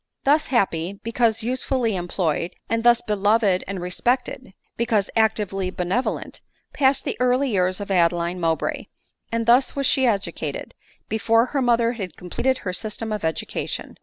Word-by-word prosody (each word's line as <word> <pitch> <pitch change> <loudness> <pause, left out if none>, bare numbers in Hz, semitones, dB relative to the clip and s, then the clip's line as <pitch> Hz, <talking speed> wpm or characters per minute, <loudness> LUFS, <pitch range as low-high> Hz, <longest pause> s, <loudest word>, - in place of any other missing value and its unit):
Thus 295 +3 +3
happy, 190 -7 0
because 225 +1 0
usefully 250 -2 0
employed, 175 -1 -2
and 230 0 -1
thus 240 0 +5
be 210 - -1
loved 210 +3 +2 0.2
and 195 -1 -4
respected, 240 +5 -2 0.2
because 225 -4 0
actively 205 -4 +1
benevolent, 185 +7 -2 0.3
passed 270 -1 +2
the - - -2
early 250 +1 +2
years 185 -1 +1
of 205 -1 -5
Adeline 175 0 +1
Mowbray; 165 -2 -1 0.4
and 230 0 -1
thus 245 +3 +4
was 275 -1 -1
she 265 0 +3
educated, 200 -4 -2 0.3
before 225 +2 +2
her 275 +2 -2
mother 235 -1 +3
had 195 -8 -6
completed 260 +9 -1
her 185 - -2
system 220 +3 -3
•of 210 -3 -3
education. 160 0 -3
220 Hz, 150 wpm, -23 LUFS, 185-245 Hz, 0.4 s, thus